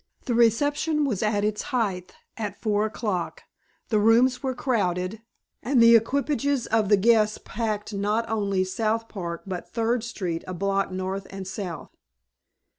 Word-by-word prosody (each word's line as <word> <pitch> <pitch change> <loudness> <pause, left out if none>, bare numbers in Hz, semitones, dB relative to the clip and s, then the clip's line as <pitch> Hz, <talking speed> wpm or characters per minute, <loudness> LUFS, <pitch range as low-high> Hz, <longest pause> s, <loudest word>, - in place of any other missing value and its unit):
The 245 - -1
reception 290 +7 +2
was 220 -9 -1
at 210 -1 +1
its 210 0 0
height 200 -9 -2 0.2
at 210 -3 -5
four 215 -1 +1
o'clock. 205 -5 -3 0.5
The 215 - +3
rooms 235 +4 +4
were 260 -2 -2
crowded, 200 -5 -1 0.4
and 260 0 +2
the 230 0 +8
equipages 280 +2 +1
of 220 -3 +1
the 205 - +6
guests 215 0 +3
packed 215 -2 -3
not 210 +3 0
only 200 -3 0
South 220 +4 -1
Park 170 -6 -6
but 185 -2 -6
Third 230 0 0
Street 185 -8 -4
a 185 - -4
block 195 +1 0
north 190 +1 -4
and 195 -1 -7
south. 185 -7 -6
215 Hz, 150 wpm, -25 LUFS, 195-235 Hz, 0.5 s, the